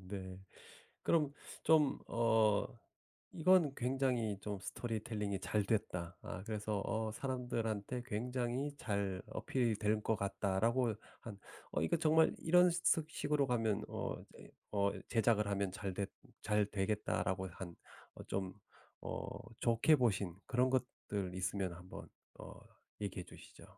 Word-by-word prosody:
네. 95 -1 -5 0.6
그럼 150 -4 +3 0.3
좀 155 -3 +5
어 110 -3 +3 0.7
'이건 170 -3 +5
굉장히 125 -5 +1
좀 105 -1 -4
스토리텔링이 105 -3 -3
잘 105 +1 +1
됐다. 90 -5 -1
아 90 - -6
그래서 105 -1 -2
어 110 -1 -1
사람들한테 120 -2 -2
굉장히 125 +4 -1
잘 100 -6 -1
어필이 120 -5 0
될 105 0 +1
것 110 - +1
같다.'라고 105 +4 +1 0.3
한 105 -4 -8 0.3
'어 - - +1
이거 80 - +2
정말 160 +1 +4
이런 180 +2 +6
석 165 -2 +2
식으로 150 -2 +1
가면 115 -5 +1
어 - - -3
이제 - - -14 0.2
어 100 -1 +3 0.2
제작을 110 -2 +3
하면 100 -1 0
잘 95 -1 -4
됐 100 0 -2 0.3
잘 105 -1 +2
되겠다.'라고 95 -2 -1
한 85 -1 -8 0.4
어 - - -8
좀 95 -1 -2 0.5
어 - - -4 0.3
좋게 120 +7 +5
보신 100 - +1
그런 125 +1 +3
것들 105 -7 -2
있으면 95 0 -1
한번 90 +2 -9 0.3
어 - - -10 0.4
얘기해 95 -3 -3
주시죠. - - -14
110 Hz, 245 characters per minute, -36 LUFS, 100-125 Hz, 0.7 s, 이런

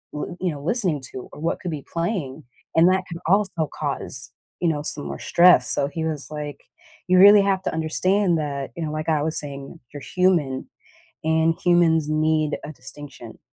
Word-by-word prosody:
l 160 +4 -5
you 180 - 0
know, 150 - -6
l 140 - -11
listening 180 - 0
to, 130 - -8
or - - -11
what 165 +2 -2
could 175 - -4
be 145 -3 -6
playing, 165 -5 -3 0.3
and 165 +2 +6
that 185 0 +2
can 170 0 -6
also 185 -4 +1
cause, 130 -4 -4 0.3
you 175 - 0
know, 150 -2 -1
some 70 - -1
more 70 0 -6
stress, 170 -8 +5
so 140 - 0
he 160 +2 -5
was 150 -3 -3
like, 150 -2 -6 0.5
"You 185 0 +4
really 205 +1 +9
have 195 -1 0
to - - -2
understand 175 +3 +1
that," 140 -2 -4
you 170 - -4
know, 150 - -4
like 155 +1 -4
I 155 -2 +2
was 160 0 -1
saying, 140 +2 -8
"you're 145 - -7
human, 170 -8 +1 0.6
and 160 +1 +2
humans 165 -3 +3
need 155 -1 +1
a 155 - -6
distinction." 140 +2 -11
160 Hz, 195 wpm, -23 LUFS, 145-175 Hz, 0.6 s, really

